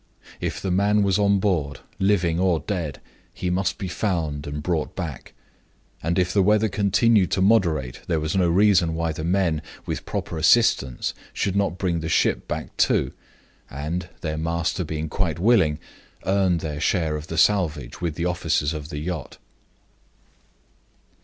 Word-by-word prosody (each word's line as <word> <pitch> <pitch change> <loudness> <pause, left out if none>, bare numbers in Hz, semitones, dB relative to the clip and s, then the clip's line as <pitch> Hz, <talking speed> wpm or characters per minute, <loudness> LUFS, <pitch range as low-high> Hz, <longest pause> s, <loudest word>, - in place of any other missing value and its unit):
If - - -3
the 95 - -2
man 100 +3 +3
was 100 0 +2
on 100 -1 +4
board 85 -8 -1 0.2
living 90 -4 +2
or 90 -4 +2
dead 80 -6 -3 0.4
he 90 - -2
must 95 +1 0
be 95 - -4
found 85 -7 -2
and 75 0 -5
brought 85 -3 -1
back. 80 -8 -6 0.7
And 85 +3 -1
if 90 -1 +1
the 100 - +4
weather 105 +3 +3
continued 100 0 +3
to - - 0
be - - +4
moderate, 85 - +2
there 80 - +1
was 75 +2 -2
no 90 -2 +3
reason 90 -3 +4
why 85 0 -1
the 80 - -5
men, 85 -3 +1 0.2
with - - -4
proper 80 - -3
assistance, 80 - +3 0.2
should 95 - -1
not 100 -3 0
bring 90 -4 0
the 80 0 -4
ship - - +1
back, - - -5
too, - - +2 0.6
and 75 +6 -4
(their 75 -1 -3
master 85 +3 -1
being 80 0 -4
quite 80 -1 -1
willing) 90 -6 +3 0.5
earn 95 -2 +2
their 75 -2 -4
share 80 -3 +1
of 75 +1 -6
the 80 - -5
salvage 80 -9 +1
with 85 -3 -2
the 85 - -2
officers 85 -3 0
of 75 -1 -6
the 75 - -5
yacht. 80 -1 -5
85 Hz, 165 wpm, -24 LUFS, 80-95 Hz, 0.7 s, on